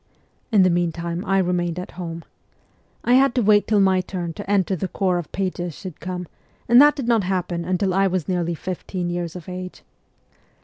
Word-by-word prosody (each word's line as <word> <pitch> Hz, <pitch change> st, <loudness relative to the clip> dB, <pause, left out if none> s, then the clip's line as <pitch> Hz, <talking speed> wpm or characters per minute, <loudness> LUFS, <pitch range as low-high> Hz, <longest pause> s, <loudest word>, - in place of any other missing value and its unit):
In 205 Hz, -4 st, +5 dB
the 185 Hz, -, +4 dB
meantime 170 Hz, 0 st, -1 dB
I 195 Hz, -1 st, +2 dB
remained 175 Hz, -2 st, 0 dB
at 180 Hz, -, -6 dB
home. 170 Hz, -2 st, -6 dB, 0.8 s
I 245 Hz, -, +3 dB
had 265 Hz, 0 st, +4 dB
to 245 Hz, -, +2 dB
wait 205 Hz, 0 st, +4 dB
till 215 Hz, -2 st, +3 dB
my 190 Hz, -1 st, +4 dB
turn 175 Hz, -3 st, -5 dB
to 185 Hz, -, -8 dB
enter 195 Hz, -2 st, +2 dB
the 185 Hz, +2 st, -3 dB
corps 185 Hz, -2 st, 0 dB
of 170 Hz, -, -8 dB
pages 180 Hz, -4 st, -3 dB
should 185 Hz, -5 st, -9 dB
come, 180 Hz, +1 st, -5 dB, 0.4 s
and 240 Hz, +3 st, +8 dB
that 295 Hz, 0 st, +6 dB
did 270 Hz, -5 st, -4 dB
not 230 Hz, -4 st, +3 dB
happen 180 Hz, -2 st, -2 dB
until 185 Hz, +2 st, 0 dB
I 195 Hz, +1 st, +3 dB
was 185 Hz, -4 st, -2 dB
nearly 175 Hz, -2 st, -1 dB
fifteen 180 Hz, 0 st, -4 dB
years 175 Hz, -1 st, -4 dB
of 175 Hz, -3 st, -9 dB
age. 185 Hz, 0 st, -7 dB
185 Hz, 195 wpm, -22 LUFS, 175-195 Hz, 0.8 s, and